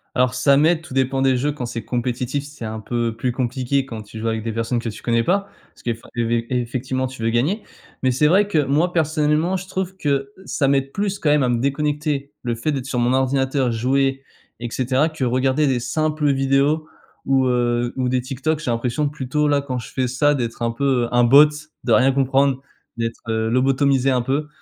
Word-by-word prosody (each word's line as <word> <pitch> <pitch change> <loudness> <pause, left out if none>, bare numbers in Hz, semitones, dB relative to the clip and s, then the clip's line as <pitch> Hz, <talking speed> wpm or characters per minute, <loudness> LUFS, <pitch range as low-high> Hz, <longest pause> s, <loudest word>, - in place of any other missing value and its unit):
Alors, 125 0 +2
ça 135 +2 +3
m'aide, 160 +3 +3
tout 165 -6 -11
dépend 135 0 +1
des 130 -1 +3
jeux. 145 +4 0
Quand 140 -4 -5
c'est 115 -1 -5
compétitif, 125 +3 -2
c'est 145 -5 -9
un 110 0 -5
peu 115 0 -2
plus 125 +2 -1
compliqué, 130 +2 -1
quand 115 -4 -7
tu 105 +1 -11
joues 115 - -3
avec 110 0 -1
des 115 - -2
personnes 115 +2 -1
que 115 - -4
tu 105 - -10
connais 115 -1 +2
pas. 195 +6 +1 0.2
Parce - - -22
que 120 - 0
effa 115 0 -8
évé 115 0 0
effectivement 130 +1 -2
tu 130 -2 -8
veux 115 - +1
gagner. 145 - 0 0.4
Mais 130 - +2
c'est 135 +5 +2
vrai 195 +6 +4
que, 205 - -1
moi, 150 +5 +2
personnellement, 155 +2 +1
je 185 0 -5
trouve 190 0 -3
que 140 -4 -1
ça 140 - 0
m'aide 135 0 +1
plus 200 -1 -2
quand 150 - +1
même 145 -2 +4
à 125 - +1
me 120 - +1
déconnecter, 145 +1 -1
le 120 -2 -2
fait 120 +7 -1
d'être 135 -3 -3
sur 130 - -3
mon 120 +1 +2
ordinateur 130 0 +1
jouer 135 +3 0 0.4
et 120 - -4
cetera, 130 +5 +1
que 155 -4 -5
regarder 130 +4 +2
des 130 -2 +1
simples 155 +2 0
vidéos 135 +3 +1 0.4
ou, 135 -1 +3
heu, 120 -1 +1
ou 130 -1 0
des 125 0 +1
TikTok. 135 +5 -2
J'ai 140 -5 -2
l'impression 125 +5 -1
plutôt 150 +1 -1
là, 145 -1 +2
quand 130 -2 -4
je 120 - -7
fais 130 -1 0
ça, 145 +4 +2
d'être 120 -3 -3
un 115 - +1
peu, 125 -1 +1
un 120 0 +4
bot, 140 +5 +8 0.4
de 120 - -1
rien 130 +4 +5
comprendre, 135 0 +2 0.4
d'être, 115 0 -3
heu, 110 0 0
lobotomisé 135 +1 +2
un 125 -2 +1
peu. 140 +4 -1
130 Hz, 220 wpm, -21 LUFS, 120-145 Hz, 0.4 s, bot